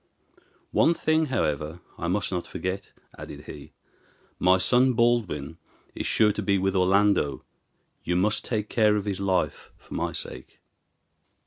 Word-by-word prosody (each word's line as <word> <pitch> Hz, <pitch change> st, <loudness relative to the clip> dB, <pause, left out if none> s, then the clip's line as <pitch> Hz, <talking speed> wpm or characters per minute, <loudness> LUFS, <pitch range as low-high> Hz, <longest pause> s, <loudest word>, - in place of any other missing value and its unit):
One 170 Hz, -, +4 dB
thing, 155 Hz, 0 st, +1 dB
however, 75 Hz, -, -1 dB, 0.2 s
I 85 Hz, -, -4 dB
must 100 Hz, +3 st, -1 dB
not 90 Hz, -2 st, -3 dB
forget," 95 Hz, +1 st, -4 dB, 0.3 s
added -, -, -9 dB
he; -, -, -11 dB, 0.7 s
"my 95 Hz, +1 st, +5 dB
son 125 Hz, +6 st, +3 dB
Baldwin 110 Hz, -, 0 dB, 0.3 s
is -, -, -4 dB
sure 105 Hz, -1 st, +4 dB
to 105 Hz, -, -4 dB
be 100 Hz, -1 st, +2 dB
with 95 Hz, +1 st, 0 dB
Orlando; 95 Hz, -5 st, +2 dB, 0.6 s
you 90 Hz, -, -1 dB
must 105 Hz, +4 st, +1 dB
take 105 Hz, -3 st, -2 dB
care 105 Hz, -2 st, +3 dB
of 105 Hz, -1 st, -2 dB
his 100 Hz, -2 st, -2 dB
life 95 Hz, -2 st, -1 dB
for -, -, -13 dB
my -, -, -1 dB
sake." -, -, -7 dB
100 Hz, 145 wpm, -26 LUFS, 90-110 Hz, 0.7 s, my